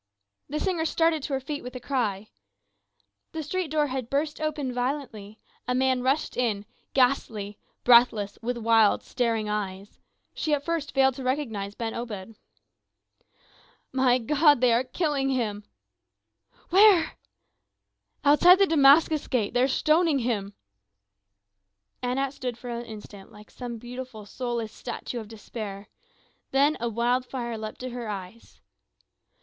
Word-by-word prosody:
The 300 Hz, +2 st, -2 dB
singer 345 Hz, -3 st, 0 dB
started 325 Hz, -1 st, +2 dB
to 275 Hz, -, -4 dB
her 265 Hz, -, +1 dB
feet 290 Hz, +2 st, -5 dB
with 250 Hz, +1 st, -9 dB
a -, -, -4 dB
cry. 220 Hz, -6 st, -2 dB, 1.0 s
The 320 Hz, -, -4 dB
street 365 Hz, +4 st, -2 dB
door 300 Hz, 0 st, +2 dB
had 255 Hz, -3 st, -4 dB
burst 295 Hz, +2 st, -1 dB
open 295 Hz, -4 st, -2 dB
violently, 245 Hz, -5 st, -4 dB, 0.3 s
a 250 Hz, -, 0 dB
man 260 Hz, 0 st, +2 dB
rushed 270 Hz, +4 st, 0 dB
in, 215 Hz, -5 st, -1 dB, 0.3 s
ghastly, 225 Hz, -6 st, +1 dB, 0.2 s
breathless, 235 Hz, -4 st, +4 dB
with 240 Hz, +1 st, -2 dB
wild 225 Hz, -2 st, +3 dB
staring 230 Hz, -4 st, -1 dB
eyes; 200 Hz, -1 st, -4 dB, 0.3 s
she 305 Hz, -2 st, 0 dB
at 285 Hz, 0 st, -7 dB
first 325 Hz, -4 st, -3 dB
failed 265 Hz, 0 st, +4 dB
to 265 Hz, -, -6 dB
recognize 225 Hz, -7 st, -2 dB
Ben 225 Hz, -1 st, -3 dB
Obed. 225 Hz, -3 st, -6 dB, 1.6 s
"My 260 Hz, -2 st, +3 dB
God! 290 Hz, +4 st, +4 dB
they 250 Hz, -1 st, +4 dB
are 235 Hz, +2 st, +3 dB
killing 275 Hz, 0 st, -1 dB
him!" 215 Hz, -6 st, -2 dB, 1.1 s
"Where?" 385 Hz, -3 st, +6 dB, 1.1 s
"Outside 345 Hz, +6 st, +7 dB
the 395 Hz, -, +5 dB
Damascus 310 Hz, -1 st, +5 dB
Gate 225 Hz, -5 st, 0 dB
they 245 Hz, -, +2 dB
are 260 Hz, -, +4 dB
stoning 310 Hz, +3 st, +2 dB
him!" 210 Hz, -5 st, -2 dB, 1.5 s
Anat 260 Hz, +2 st, -1 dB
stood 250 Hz, -4 st, -5 dB
for 245 Hz, 0 st, -7 dB
an 235 Hz, 0 st, -5 dB
instant 210 Hz, -2 st, -11 dB
like 210 Hz, -1 st, -15 dB
some 240 Hz, -2 st, -6 dB
beautiful 245 Hz, -2 st, -8 dB
soulless 235 Hz, -1 st, -4 dB
statue 240 Hz, 0 st, -6 dB
of 220 Hz, -, -8 dB
despair. 210 Hz, -2 st, -8 dB, 0.6 s
Then 280 Hz, +3 st, +3 dB
a 235 Hz, -, -1 dB
wild 240 Hz, +3 st, +1 dB
fire 240 Hz, -2 st, -5 dB
leapt 215 Hz, -1 st, -7 dB
to 255 Hz, 0 st, -5 dB
her 240 Hz, -1 st, -5 dB
eyes. 200 Hz, +2 st, -8 dB
250 Hz, 140 wpm, -26 LUFS, 225-280 Hz, 1.6 s, Outside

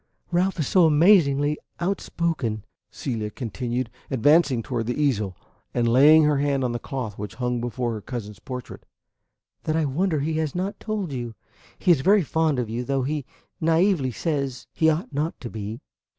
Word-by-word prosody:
"Ralph 185 Hz, +2 st, +1 dB
is 155 Hz, -, +1 dB
so 180 Hz, -3 st, +5 dB
amazingly 150 Hz, -3 st, +4 dB, 0.2 s
outspoken," 165 Hz, -, -2 dB, 0.2 s
Celia 110 Hz, -6 st, -4 dB
continued, 120 Hz, +1 st, -3 dB, 0.2 s
advancing 135 Hz, -1 st, +3 dB
toward 115 Hz, -2 st, -3 dB
the 125 Hz, -, -2 dB
easel 110 Hz, -, 0 dB, 0.4 s
and 120 Hz, -1 st, +2 dB
laying 145 Hz, +7 st, +7 dB
her 150 Hz, -2 st, +3 dB
hand 140 Hz, -2 st, +1 dB
on 125 Hz, -, 0 dB
the 120 Hz, -, -3 dB
cloth 125 Hz, -8 st, -5 dB
which 105 Hz, 0 st, -6 dB
hung 125 Hz, -1 st, -1 dB
before 120 Hz, 0 st, -2 dB
her 110 Hz, -, -5 dB
cousin's 105 Hz, -3 st, -6 dB
portrait, 125 Hz, 0 st, -8 dB, 0.8 s
"that 155 Hz, -, 0 dB
I 160 Hz, -1 st, +2 dB
wonder 155 Hz, +3 st, 0 dB
he 155 Hz, +2 st, -1 dB
has 155 Hz, -1 st, -2 dB
not 195 Hz, +3 st, -3 dB
told 210 Hz, -7 st, -3 dB
you. 120 Hz, -4 st, -5 dB, 0.4 s
He 180 Hz, -, +3 dB
is 155 Hz, -6 st, +4 dB
very 200 Hz, +4 st, +4 dB
fond 160 Hz, -1 st, +1 dB
of 125 Hz, -2 st, -1 dB
you, 115 Hz, +3 st, -3 dB
though, 135 Hz, 0 st, 0 dB
he 145 Hz, 0 st, -2 dB, 0.3 s
naively 165 Hz, -3 st, +2 dB
says, 140 Hz, -3 st, -2 dB
he 160 Hz, -, +3 dB
ought 160 Hz, 0 st, -1 dB
not 150 Hz, +4 st, -2 dB
to 120 Hz, -, -7 dB
be." 110 Hz, +1 st, -6 dB
140 Hz, 175 wpm, -24 LUFS, 120-160 Hz, 0.8 s, laying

